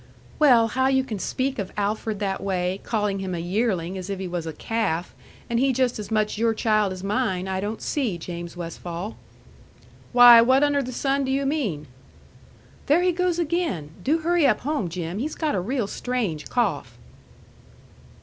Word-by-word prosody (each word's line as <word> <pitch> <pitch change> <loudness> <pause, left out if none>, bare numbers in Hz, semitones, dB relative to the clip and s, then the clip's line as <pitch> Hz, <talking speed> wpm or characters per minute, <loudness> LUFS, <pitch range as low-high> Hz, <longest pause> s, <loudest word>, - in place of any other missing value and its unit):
"Well, 245 -7 +5
how 260 +3 +1
you 265 0 +3
can 220 -6 -5
speak 260 +5 -2
of 195 - -4
Alfred 210 +1 -1
that 195 -1 -2
way, 185 0 -1
calling 210 -3 -1
him 190 -2 -3
a - - -3
yearling, 185 0 -1
as 185 +1 -7
if 195 - -2
he 190 0 -4
was 175 -2 -4
a 160 - -4
calf, 180 -3 -2 0.3
and 235 0 0
he 270 +1 +3
just 255 -2 0
as 210 - -6
much 215 -1 0
your 225 0 +2
child 215 -3 +2
as 185 0 -7
mine, 200 -3 -1
I 190 0 -2
don't 210 +3 -4
see, 245 - -1
James 170 0 -7
Westfall!" 175 +3 -6 1.0
"Why, 245 -1 +9
what 260 +4 +4
under 290 -1 +2
the 255 -1 -5
sun 275 +2 0
do 265 - -3
you 275 +1 0
mean?" 230 - -1 1.0
"There 320 +5 +4
he 365 - +3
goes 355 0 0
again! 325 - -1
Do 300 +5 +2
hurry 330 -2 +2
up 215 - +2
home, 285 - -1
Jim. 175 +2 -4
He's 300 +6 -3
got 310 -2 -1
a 185 - 0
real 240 +4 -1
strange 205 -9 -3
cough." 155 - -1
215 Hz, 185 wpm, -24 LUFS, 185-265 Hz, 1.0 s, Why